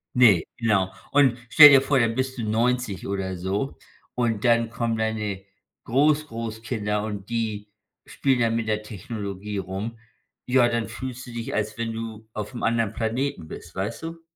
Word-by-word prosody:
Ne, 110 -9 +6
genau. 105 -6 +1 0.2
Und 135 -4 +4
stell 150 +2 +11
dir 135 -1 +7
vor, 135 0 +1
dann 115 -1 +1
bist 130 0 -2
du 115 - -3
90 115 -2 0
oder 95 -2 -3
so. 100 +9 -2 0.4
Und 115 -4 -1
dann 115 -2 +3
kommen 115 -1 -1
deine 105 -3 -2 0.4
Groß-Großkinder. 115 -6 0
Und 105 -2 -6
die 110 -3 -2 0.4
spielen 135 -2 0
dann 115 -1 +2
mit 115 -1 -1
der 105 0 -1
Technologie 105 -1 -6
rum. 100 +5 -4 0.5
Ja, 125 -1 +4
dann 115 -1 -1
fühlst 130 -1 -7
du - - -8
dich, 115 -1 -5
als 105 0 -2
wenn 115 -1 -2
du 110 -1 -7
aufm 105 +4 -5
anderen 115 -2 +1
Planeten 115 - -2
bist, - - -10
weißt 100 +10 -4
du? 165 0 -6
115 Hz, 165 wpm, -25 LUFS, 105-125 Hz, 0.5 s, stell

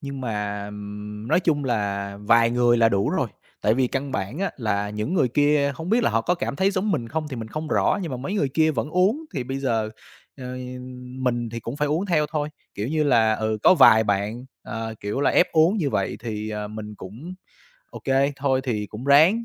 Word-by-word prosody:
nhưng 140 -1 -6
mà 105 -3 -3 0.6
nói 170 +4 +3
chung 150 -5 +1
là 100 -4 -2
vài 115 +2 +4
người 120 0 +3
là 115 -1 +5
đủ 100 -2 +1
rồi, - - 0 0.3
tại 110 - +3
vì 130 0 +2
căn 135 +1 -3
bản 100 - -3
á 195 - 0
là 105 -4 -1
những 105 - -3
người 130 -8 +3
kia 145 +1 +2
không 165 +5 -7
biết 235 +1 +3
là - - +2
họ 115 +1 +2
có 180 - +1
cảm 140 - -3
thấy 190 +3 +3
giống 200 +2 -1
mình 120 -9 -1
không 155 +2 -3
thì 130 - -6
mình 110 -1 -6
không 155 +5 -5
rõ - - +2
nhưng 165 - -4
mà 130 - -3
mấy 165 +11 -4
người 145 -9 +1
kia 160 -1 +4
vẫn 125 +1 -2
uống 200 - +2
thì 130 - -2
bây 135 +2 -4
giờ, 115 -5 0 0.5
ờ, 130 - -9 0.7
mình 120 -2 -1
thì 115 0 -5
cũng 120 +6 -6
phải 150 0 0
uống 165 +7 0
theo 155 -4 +2
thôi. 150 -2 -1 0.3
Kiểu 105 +5 -3
như 155 0 +1
là, 115 -5 +4
ừ, 110 0 -1
có - - +7
vài 110 -7 +7
bạn, 105 +4 -1 0.2
à, 115 +1 -5
kiểu 105 +7 -2
là, - - +3
ép - - +3
uống 165 +6 +4
như 150 -8 0
vậy 100 - -1
thì, 110 -2 -4
ờ, 105 -1 -4
mình 105 0 -7
cũng 115 - -9 0.6
ô - - -8
kê, 135 +1 +2
thôi, 130 -2 +1
thì 105 -5 -2
cũng 110 +6 -9
ráng, 160 +11 +5
130 Hz, 230 wpm, -24 LUFS, 110-150 Hz, 0.7 s, có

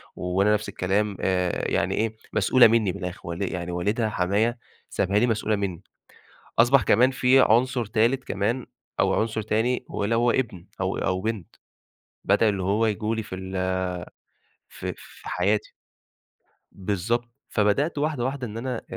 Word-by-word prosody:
وأنا 95 +4 +1
نفس 105 0 -1
الكلام 100 +2 -1
آآ، 90 -2 0
يعني - - +1
ايه 110 0 -1 0.2
مسؤولة 130 -2 +6
مني 110 -4 +2
من - - -7
الأخر 90 +3 -5
والّا 85 +3 -2
إيه - - -4
يعني 90 0 -4
والدها 105 +6 0
حمايا 105 +5 +1 0.3
سابها 100 +3 +1
لي 120 - +3
مسؤولة 110 -1 0
مني، 95 -4 -3 0.8
أصبح 125 +2 +6
كمان 125 +6 +4
في 130 0 +4
عنصر 125 +1 +3
تالت 120 +4 +1
كمان 110 +6 -1 0.3
أو - - +3
عنصر 110 0 -1
تاني 115 +4 0
هو 105 - -2
اللي 110 +3 +1
هو 120 +1 +3
ابن 105 -9 -2
أو 95 0 -1
أو 95 -1 0
بنت، 110 -4 -4 0.7
بدل 105 +3 +3
اللي 95 -2 -2
هو 105 +4 +2
ييجوا 110 +1 -1
لي 110 - -3
في 95 - -7
ال 95 - -7 1.3
في - - -6
في - - -13
حياتي، 100 +4 0 1.0
بالضبط، 105 +5 -2 0.2
فبدأت 115 +10 +1
واحدة 145 -3 -1
واحدة 130 -1 -3
إن 110 +1 -7
أنا 125 0 -3
110 Hz, 160 wpm, -25 LUFS, 95-120 Hz, 1.3 s, مسؤولة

